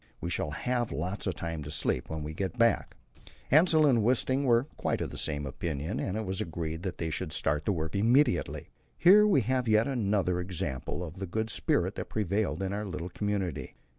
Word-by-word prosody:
We 85 - -4
shall 75 - 0
have 120 +10 -1
lots 90 +9 -3
of 95 - -1
time 80 -2 -4
to 70 - -7
sleep 70 -4 -1
when 80 -1 -4
we 75 +1 -5
get 95 +7 -3
back." 115 0 +2 0.6
Hassel 155 +1 +6
and 125 -6 +4
Wisting 130 +4 +1
were 120 -1 +4
quite - - -1
of - - -3
the - - -8
same 75 -1 -1
opinion, 75 - -3
and 95 +2 -2
it 110 - -3
was 95 0 -1
agreed 80 -1 -4
that 95 -1 -4
they 80 -1 -3
should 80 +2 -3
start 75 0 0
the - - +2
work 80 -1 -3
immediately. 115 0 +2 0.3
Here 205 +5 +7
we 190 -10 +4
have 125 +2 0
yet 110 +2 +4
another 100 -8 0
example 90 -4 -3
of 85 +1 -8
the 95 0 -4
good 110 +5 -2
spirit - - 0
that - - -5
prevailed 100 -3 -1
in 95 +1 -2
our 105 +1 -3
little 90 -1 -5
community. 90 -8 -3
95 Hz, 205 wpm, -29 LUFS, 80-115 Hz, 0.6 s, Here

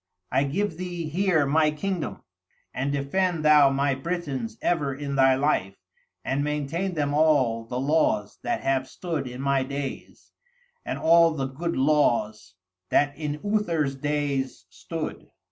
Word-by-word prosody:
I 135 +2 +2
give 170 +4 -2
thee 175 -3 -4
here 175 -2 +2
my 155 +2 +3
kingdom, 170 +2 -4 0.5
and 135 +2 -1
defend 155 +4 0
thou 150 -2 +7
my 140 +1 +1
Britons 135 -7 -4
ever 145 -6 0
in 140 0 -4
thy 135 -1 +5
life, 130 -9 0 0.5
and 140 +2 0
maintain 150 +5 -2
them 145 -2 0
all 140 -7 +3
the 125 +2 -4
laws 135 -7 +1
that 120 - -2
have 135 -1 0
stood 160 -5 -4
in 125 +1 -7
my 140 -1 +2
days, 140 0 -6 0.5
and - - -4
all 165 +1 +5
the 135 -3 -2
good 165 +6 -3
laws 120 -8 +1 0.3
that 140 +5 +2
in 150 -1 -4
Uther's 170 -10 0
days 145 -1 -2
stood. - - -6
145 Hz, 145 wpm, -25 LUFS, 135-160 Hz, 0.5 s, thou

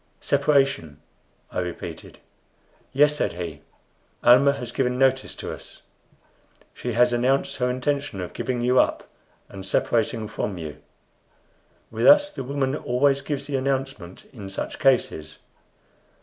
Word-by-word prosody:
"Separation!" 135 - +1 0.5
I - - -2
repeated. 90 -1 -6 0.7
"Yes," 150 +2 +4
said - - -1
he. 85 -4 -6 0.6
"Almah 130 +4 +6
has 125 -4 -6
given 125 -1 0
notice 135 0 +2
to - - -6
us. - - -12 0.9
She 120 - -4
has 120 +2 +4
announced 135 +3 +1
her 125 -1 +1
intention 140 -3 -2
of 90 - -5
giving 125 -2 -2
you 125 +1 +4
up, - - +1 0.4
and 95 -1 -9
separating 110 +3 0
from 105 -2 -4
you. 75 -3 -7 1.1
With 115 +1 +1
us 295 0 +7
the - - -5
woman 135 +1 -1
always 135 +1 +1
gives 140 -1 -4
the 140 -1 -2
announcement 135 -9 -3
in 100 -6 -8
such 95 - -5
cases. 120 - +1
125 Hz, 135 wpm, -24 LUFS, 105-140 Hz, 1.1 s, us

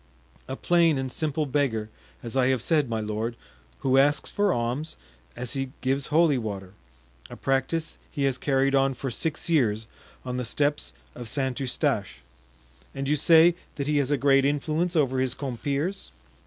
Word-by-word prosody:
"A 130 - -4
plain 170 -1 +3
and 130 -1 -3
simple 155 +1 -1
beggar, 125 -6 -1 0.3
as 115 +1 -5
I 130 -1 +3
have 130 -3 +1
said, 150 -6 +2
my 115 -1 -1
lord, 110 +2 -3 0.5
who 135 0 +3
asks 145 +2 +2
for 205 -1 +2
alms, 125 +5 -2 0.4
as 125 - -4
he 135 -1 -3
gives 135 +2 0
holy 155 -3 +3
water; 100 -4 -6 0.6
a - - -9
practice 135 +5 -1
he 140 - -3
has 135 -2 +1
carried 135 -1 +1
on 135 -1 +3
for 135 +1 -4
six 160 +5 -2
years 115 -10 +2 0.4
on 125 0 -3
the 125 - -1
steps 145 - 0 0.2
of 120 -2 -6
St. 130 +1 -1
Eustache." 130 -3 -1 0.7
"And 135 0 -3
you 150 - +3
say 165 +3 +6 0.2
that 140 - -3
he 150 +1 +1
has 140 -2 +1
a 145 - +2
great 135 -1 +4
influence 155 +5 0
over 135 -4 +2
his 130 -1 0
compeers?" 140 +7 -3
135 Hz, 170 wpm, -26 LUFS, 125-150 Hz, 0.7 s, say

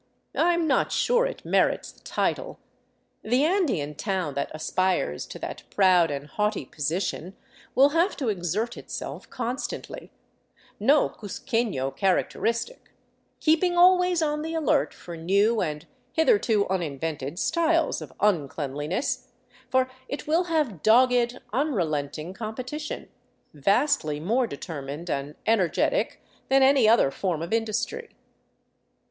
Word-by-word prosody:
I 345 +2 +3
am 340 -1 0
not 280 -4 +2
sure - - +2
it - - -8
merits - - +1
the - - -24
title. - - -2 0.6
The 250 +6 +2
Andean 310 - +1
town 185 -2 -2
that 140 - -2
aspires 165 - -1
to - - -8
that - - -6
proud, 185 -4 +4
and 140 0 -4
haughty 210 +7 -1
position 175 +4 -3 0.4
will 275 +2 +6
have 335 +6 +1
to 265 -7 -1
exert 205 +5 -2
itself - - -7
constantly 250 +2 -5 0.3
— - - -32
no 300 - +4
cuzquefio 205 - -3
characteristic 230 - -1 0.2
— - - -44
keeping 345 +3 +3
always 360 -1 +5
on 300 -1 0
the 320 +1 -4
alert 315 -6 +2
for 175 - -10
new 200 +7 +2
and 150 -3 -3 0.3
hitherto 320 - +3
un 190 -1 0
invented 150 -1 -4
styles 330 - +1
of - - -8
uncleanliness; 150 - -1 0.4
for 260 0 +3 0.2
it 280 - -5
will 330 +4 +2
have 300 - -1
dogged, 245 +1 +4 0.2
unrelenting 170 - -1
competition, 255 +8 -5 0.5
vastly 155 - +1
more 230 +10 +1
determined 145 +1 -6
and 140 +2 -3
energetic 225 - +1 0.3
than 270 0 +5
any 265 -4 +5
other 225 -12 +4
form 170 -3 -2
of 170 - -4
industry. 230 - -1
220 Hz, 130 wpm, -26 LUFS, -, 0.6 s, will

